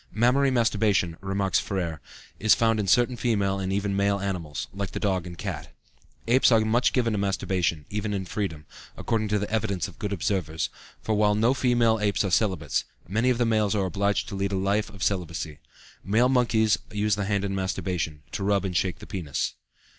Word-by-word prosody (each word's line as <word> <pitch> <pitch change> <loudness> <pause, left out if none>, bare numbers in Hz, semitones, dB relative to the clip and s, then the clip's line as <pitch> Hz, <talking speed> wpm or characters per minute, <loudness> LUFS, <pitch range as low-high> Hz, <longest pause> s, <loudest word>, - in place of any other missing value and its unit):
Mammary 125 +5 +3
masturbation, 105 -8 +2
remarks 95 0 0
Féré, 85 -5 -3 0.4
is 110 - +5
found 115 -1 +2
in 100 - -1
certain 120 +5 +3
female 100 -5 0
and 95 0 -2
even 100 0 -1
male 100 0 +1
animals, 90 -7 -4
like 100 -1 -4
the - - -3
dog 95 -4 0
and 85 - -8
the - - -9
cat. - - -5 0.5
Apes 125 +2 +5
are 115 -1 +5
much 115 +3 +2
given 115 -3 +1
to 105 - 0
masturbation, 90 -5 -1
even 105 0 -2
in 95 -2 -2
freedom, 85 -6 -4 0.3
according 110 -2 -1
to 105 0 +1
the 105 0 -2
evidence 110 -4 -1
of - - -14
good 105 - -3
observers; 85 -4 -1 0.3
for 110 - 0
while 105 0 +3
no 115 +4 +3
female 120 -4 +2
apes 105 -1 +1
are 95 - -2
celibates, 95 -3 +1 0.2
many 110 +7 +1
of 125 - +2
the 120 - +2
males 110 -2 +2
are 100 -2 +1
obliged 100 +2 0
to 100 - -5
lead 100 +1 -1
a - - +1
life 100 +3 0
of 100 -3 -7
celibacy. 85 -5 -2 0.4
Male 115 +6 +3
monkeys 110 -5 +3
use 105 0 +1
the 100 0 0
hand 100 0 0
in 100 - -2
masturbation, 90 -5 -2
to - - -3
rub 100 -1 +1
and 90 -2 -3
shake 90 0 0
the - - -11
penis. 85 -8 -3
100 Hz, 200 wpm, -26 LUFS, 95-110 Hz, 0.5 s, is